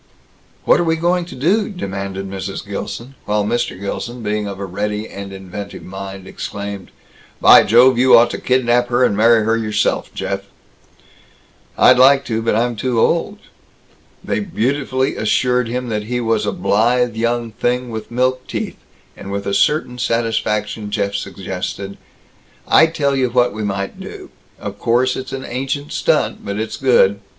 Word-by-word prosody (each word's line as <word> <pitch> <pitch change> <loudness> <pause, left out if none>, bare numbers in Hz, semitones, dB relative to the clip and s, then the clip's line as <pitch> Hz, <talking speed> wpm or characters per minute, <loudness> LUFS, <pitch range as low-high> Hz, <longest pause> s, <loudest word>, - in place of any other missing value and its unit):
"What - - +5
are - - +2
we 165 -1 +1
going 175 +2 0
to 170 - -10
do?" 190 - +1
demanded 100 - -5
Mrs. 95 +1 -6
Gilson; 115 +5 -6
while 105 0 0
Mr. 120 -4 -1
Gilson, 120 +4 -5
being 105 0 -1
of 100 -1 -6
a 100 - -3
ready 105 +3 -3
and 100 0 -8
inventive 95 +1 -8
mind, 95 0 -8
exclaimed, 100 -1 -6 0.5
"By - - +8
Jove, 120 +2 +5
you 125 -1 +7
ought 120 +1 +4
to - - -4
kidnap 120 -1 +2
her 120 +1 +2
and 100 - +2
marry 115 +1 +4
her 115 +1 +2
yourself, 105 -2 -1
Jeff!" 100 0 -3 1.4
"I'd 125 0 +6
like 135 +2 +6
to. 115 -1 -2
But 115 -1 +1
I'm 120 +1 +1
too 120 +1 -1
old." 170 - +1 0.9
They 235 - -1
beautifully 135 - -1
assured 125 +3 +1
him 125 +1 -3
that 105 -1 -2
he 125 +2 -2
was 115 -3 0
a - - +1
blithe 120 +4 +1
young 115 0 -1
thing 125 +2 -1
with 110 -1 -6
milk 130 +1 0
teeth; - - -4 0.4
and 100 - -8
with 100 0 -3
a 100 - -1
certain 125 +2 +1
satisfaction 110 -2 -1
Jeff 100 -1 -1
suggested, 95 +1 -5 0.7
"I 160 - +6
tell 140 -4 0
you 130 -2 +1
what 125 -1 +2
we 110 0 -4
might 100 -1 -3
do. - - -9 0.3
Of 100 0 -7
course 125 +2 +2
it's 130 - -6
an 135 0 -5
ancient 135 +4 -3
stunt, - - 0
but 100 +1 -4
it's 110 0 -3
good. 100 -7 +3
115 Hz, 165 wpm, -18 LUFS, 100-125 Hz, 1.4 s, By